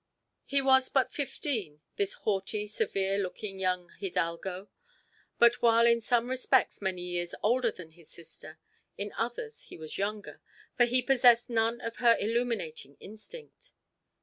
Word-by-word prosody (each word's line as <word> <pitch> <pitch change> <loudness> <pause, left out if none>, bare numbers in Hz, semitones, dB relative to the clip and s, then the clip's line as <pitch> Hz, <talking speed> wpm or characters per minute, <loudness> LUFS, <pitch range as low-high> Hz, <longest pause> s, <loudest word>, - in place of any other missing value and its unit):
He 275 0 +1
was 265 -1 +4
but 265 -2 +1
fifteen, 230 - -3
this 200 -1 0
haughty, 205 +1 -2
severe 195 -1 -1
looking 195 +1 -5
young 180 -2 -1
hidalgo, 185 0 -3 0.7
but 235 +1 +4
while 230 0 +5
in 235 0 +4
some 235 +1 +1
respects 260 -1 +1
many 185 -2 -2
years 175 -1 -3
older 240 +2 +2
than 180 -6 -11
his 165 -1 -20
sister, 160 -1 -12 0.4
in 205 0 -4
others 245 - -4
he - - -12
was 160 +2 -7
younger, 205 +1 -4 0.3
for 240 - +5
he 250 +1 +3
possessed 245 -2 +4
none 230 +1 +1
of 230 0 -6
her 235 -2 +5
illuminating 210 - -2
instinct. 460 - -12
220 Hz, 145 wpm, -29 LUFS, 185-245 Hz, 0.7 s, while